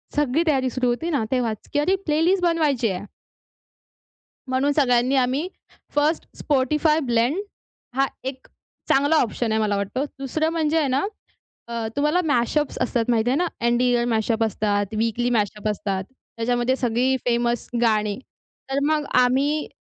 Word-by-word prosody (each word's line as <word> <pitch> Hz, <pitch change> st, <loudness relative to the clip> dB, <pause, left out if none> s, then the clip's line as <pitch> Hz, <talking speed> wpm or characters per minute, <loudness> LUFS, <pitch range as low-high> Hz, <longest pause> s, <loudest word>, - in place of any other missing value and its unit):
सगळी 295 Hz, +2 st, +2 dB
तयारी 265 Hz, -4 st, +2 dB
सुरू 255 Hz, 0 st, -1 dB
होती 245 Hz, +8 st, -1 dB
ना 285 Hz, -8 st, 0 dB
तेव्हाच 235 Hz, -4 st, -2 dB
की 290 Hz, -, +2 dB
अरे 355 Hz, +6 st, +2 dB
प्लेलिस्ट 340 Hz, +5 st, +2 dB
बनवायची 300 Hz, -9 st, +2 dB
आहे. 190 Hz, +1 st, -4 dB, 1.5 s
म्हणून 265 Hz, +3 st, +2 dB
सगळ्यांनी 255 Hz, -2 st, +2 dB
आम्ही 265 Hz, +6 st, +1 dB, 0.5 s
फर्स्ट 300 Hz, +2 st, +1 dB, 0.2 s
Spotify 300 Hz, +3 st, +2 dB
ब्लेंड 240 Hz, +9 st, +1 dB, 0.6 s
हा 275 Hz, 0 st, +3 dB, 0.2 s
एक 265 Hz, 0 st, -6 dB, 0.4 s
चांगला 285 Hz, +4 st, +3 dB
ऑप्शन 235 Hz, -4 st, 0 dB
आहे 220 Hz, -, +1 dB
मला 210 Hz, -2 st, +1 dB
वाटतो. 200 Hz, +7 st, -2 dB
दुसरं 310 Hz, +4 st, -1 dB
म्हणजे 320 Hz, -1 st, +1 dB
आहे 295 Hz, -, +1 dB
ना, 265 Hz, +1 st, +1 dB, 0.7 s
अ, 230 Hz, -1 st, -3 dB
तुम्हाला 300 Hz, +5 st, +2 dB
मॅशअप्स 290 Hz, +1 st, 0 dB
असतात 235 Hz, -3 st, 0 dB
माहिती 230 Hz, 0 st, +2 dB
आहे 265 Hz, -, +2 dB
ना. 355 Hz, -, +1 dB, 0.2 s
एन्ड 240 Hz, +1 st, +2 dB
इयर 245 Hz, -1 st, +2 dB
मॅशअप 225 Hz, +1 st, +1 dB
असतात, 205 Hz, -1 st, 0 dB
वीकली 230 Hz, +2 st, 0 dB
मॅशअप 210 Hz, -2 st, -1 dB
असतात. 195 Hz, -2 st, -2 dB, 0.3 s
त्याच्यामध्ये 240 Hz, +2 st, +1 dB
सगळी 255 Hz, +1 st, +1 dB
फेमस 240 Hz, -1 st, 0 dB
गाणी. 215 Hz, -3 st, +1 dB, 0.5 s
तर 270 Hz, +1 st, 0 dB
मग 310 Hz, -1 st, +1 dB, 0.2 s
आम्ही 280 Hz, +5 st, +1 dB
255 Hz, 150 wpm, -23 LUFS, 230-295 Hz, 1.5 s, हा